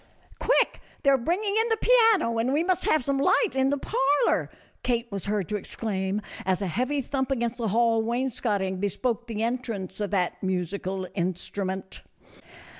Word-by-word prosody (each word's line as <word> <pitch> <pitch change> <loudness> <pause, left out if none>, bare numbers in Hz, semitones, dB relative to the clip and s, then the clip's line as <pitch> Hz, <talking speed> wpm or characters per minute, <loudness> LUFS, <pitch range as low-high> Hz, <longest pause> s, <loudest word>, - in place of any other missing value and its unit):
" - - -26
Quick! - - +2 0.2
they 275 - +5
are 270 - +5
bringing 390 - 0
in 450 +1 +2
the 450 - +2
piano 445 - +4
and 240 +3 +1
we 300 +4 +2
must 370 0 0
have 310 -6 +2
some 275 -1 +1
light 375 - +3
in 265 0 +3
the 285 - +1
parlor," 280 +1 +1 0.3
Kate 235 -1 0
was 200 -1 -4
heard 205 -4 0
to 210 - -1
exclaim, 200 -1 -3 0.2
as 185 -1 +1
a 200 - -2
heavy 255 - 0
thump 265 +1 -2
against 240 -2 -1
the 230 - 0
hall 225 +2 +3
wainscoting 220 -5 -1
bespoke 235 +4 -1
the 220 -1 -2
entrance 230 -6 -3
of 205 -1 -1
that 185 -3 -1
musical 185 0 -2
instrument. 190 +1 -3
230 Hz, 175 wpm, -26 LUFS, 195-270 Hz, 0.3 s, they